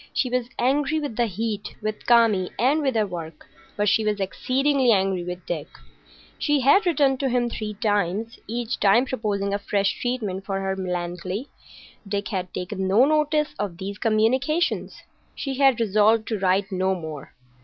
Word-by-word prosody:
She 255 Hz, -, 0 dB
was 250 Hz, -1 st, -1 dB
angry 280 Hz, +4 st, +1 dB
with 290 Hz, -7 st, -4 dB
the 235 Hz, +1 st, +1 dB
heat, 215 Hz, +1 st, -4 dB
with 215 Hz, 0 st, -5 dB
Kami, 225 Hz, -6 st, +4 dB
and 275 Hz, +6 st, +2 dB
with 270 Hz, -4 st, 0 dB
her 215 Hz, -1 st, +2 dB
work, 165 Hz, -4 st, -8 dB, 0.3 s
but 205 Hz, 0 st, +1 dB
she 220 Hz, -, +3 dB
was 210 Hz, -1 st, 0 dB
exceedingly 260 Hz, +6 st, +1 dB
angry 190 Hz, -3 st, +1 dB
with 180 Hz, 0 st, -6 dB
Dick. 160 Hz, -4 st, -4 dB, 0.7 s
She 295 Hz, -2 st, +2 dB
had 320 Hz, +10 st, +4 dB
written 275 Hz, -5 st, +2 dB
to 270 Hz, -, 0 dB
him 240 Hz, -1 st, 0 dB
three 210 Hz, -2 st, -5 dB
times,—each 220 Hz, +3 st, -2 dB
time 210 Hz, +6 st, +4 dB
proposing 205 Hz, -6 st, -2 dB
a 200 Hz, -, 0 dB
fresh 200 Hz, -1 st, -1 dB
treatment 230 Hz, -7 st, -2 dB
of 195 Hz, -, -18 dB
her 195 Hz, -1 st, -1 dB
Melancolia. 180 Hz, +3 st, -4 dB, 0.6 s
Dick 200 Hz, 0 st, -2 dB
had 185 Hz, -4 st, -3 dB
taken 185 Hz, +1 st, -3 dB
no 210 Hz, +7 st, +5 dB
notice 300 Hz, 0 st, +1 dB
of 195 Hz, -5 st, -3 dB
these 200 Hz, +2 st, -6 dB
communications. 260 Hz, +10 st, +1 dB, 0.3 s
She 270 Hz, -1 st, -4 dB
had 270 Hz, -4 st, +4 dB
resolved 215 Hz, +1 st, +3 dB
to 220 Hz, -3 st, -1 dB
write 190 Hz, +2 st, +1 dB
no 190 Hz, 0 st, +1 dB
more. 155 Hz, -5 st, -8 dB
215 Hz, 165 wpm, -24 LUFS, 190-255 Hz, 0.7 s, no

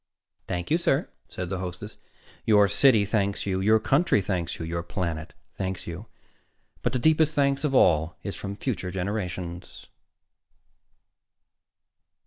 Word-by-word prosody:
"Thank 90 Hz, +5 st, -3 dB
you, 165 Hz, -, +4 dB
sir," 135 Hz, -5 st, +1 dB, 0.2 s
said 90 Hz, -1 st, -5 dB
the 95 Hz, -1 st, -3 dB
hostess. 95 Hz, +3 st, -6 dB, 0.5 s
"Your 105 Hz, -2 st, +5 dB
city 110 Hz, 0 st, +5 dB
thanks 100 Hz, -1 st, -1 dB
you; 95 Hz, -1 st, -1 dB
your 110 Hz, +3 st, +4 dB
country 135 Hz, +3 st, +3 dB
thanks 90 Hz, -3 st, -2 dB
you; 80 Hz, -, -5 dB
your 85 Hz, +1 st, -3 dB
planet 85 Hz, -2 st, -4 dB, 0.2 s
thanks 95 Hz, -1 st, -3 dB
you. 90 Hz, +6 st, -7 dB, 0.7 s
But -, -, -1 dB
the -, -, +2 dB
deepest 155 Hz, +3 st, +3 dB
thanks 140 Hz, 0 st, +2 dB
of 140 Hz, -3 st, 0 dB
all 80 Hz, -6 st, +3 dB
is 100 Hz, -, -4 dB
from 100 Hz, 0 st, -5 dB
future 105 Hz, -5 st, -3 dB
generations." 90 Hz, -2 st, -4 dB
100 Hz, 135 wpm, -26 LUFS, 90-115 Hz, 0.7 s, Your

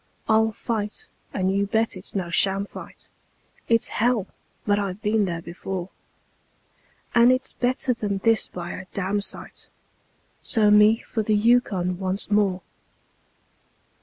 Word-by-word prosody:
I'll 220 Hz, 0 st, +3 dB
fight 215 Hz, -1 st, -4 dB, 0.2 s
and 190 Hz, 0 st, 0 dB
you 200 Hz, 0 st, +1 dB
bet 220 Hz, +1 st, 0 dB
it's 185 Hz, +2 st, -8 dB
no 180 Hz, -3 st, -2 dB
sham 195 Hz, +2 st, +2 dB
fight; -, -, -11 dB, 0.6 s
It's 230 Hz, -1 st, +3 dB
hell! 230 Hz, -3 st, +1 dB, 0.4 s
but 205 Hz, 0 st, +2 dB
I've 195 Hz, -1 st, -3 dB
been 210 Hz, 0 st, +2 dB
there 170 Hz, -2 st, -4 dB
before; 180 Hz, +1 st, -6 dB, 1.2 s
And 235 Hz, +1 st, +6 dB
it's 255 Hz, 0 st, 0 dB
better 250 Hz, +1 st, 0 dB
than 205 Hz, -4 st, -2 dB
this 225 Hz, +2 st, +2 dB
by 175 Hz, -1 st, -7 dB
a -, -, -7 dB
damsite 200 Hz, +1 st, -1 dB, 0.7 s
So 215 Hz, -3 st, +3 dB
me 210 Hz, +2 st, +6 dB
for 225 Hz, -, -3 dB
the 215 Hz, 0 st, +1 dB
Yukon 205 Hz, -5 st, +2 dB
once 190 Hz, +2 st, -2 dB
more. 195 Hz, -3 st, +2 dB
205 Hz, 135 wpm, -24 LUFS, 190-225 Hz, 1.2 s, And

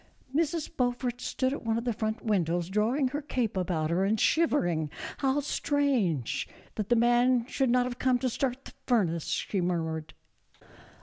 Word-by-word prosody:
Mrs. 325 Hz, +1 st, 0 dB
Beaufort 245 Hz, -1 st, -1 dB
stood 260 Hz, +1 st, -1 dB
at -, -, -5 dB
one 225 Hz, -1 st, 0 dB
of 230 Hz, -, -2 dB
the 240 Hz, -1 st, 0 dB
front 220 Hz, +2 st, -3 dB
windows, 175 Hz, -4 st, +1 dB
drawing 235 Hz, +7 st, +1 dB
her 290 Hz, +3 st, -3 dB
cape 250 Hz, -7 st, -2 dB
about 170 Hz, -4 st, -1 dB
her 180 Hz, +3 st, +2 dB
and 210 Hz, +2 st, +1 dB
shivering; 175 Hz, -, +2 dB, 0.3 s
"how 275 Hz, +1 st, +2 dB
strange 265 Hz, -, 0 dB, 0.3 s
that 210 Hz, -2 st, -4 dB
the 240 Hz, -, +5 dB
man 240 Hz, +1 st, +4 dB
should 265 Hz, 0 st, 0 dB
not 250 Hz, +1 st, +3 dB
have 245 Hz, -1 st, -5 dB
come 255 Hz, -1 st, +3 dB
to 255 Hz, -, -1 dB
start 255 Hz, +1 st, -2 dB
the -, -, -11 dB
furnace," 180 Hz, -, +1 dB
she 195 Hz, -, -1 dB
murmured. 160 Hz, -3 st, -2 dB
240 Hz, 170 wpm, -29 LUFS, 185-260 Hz, 0.3 s, the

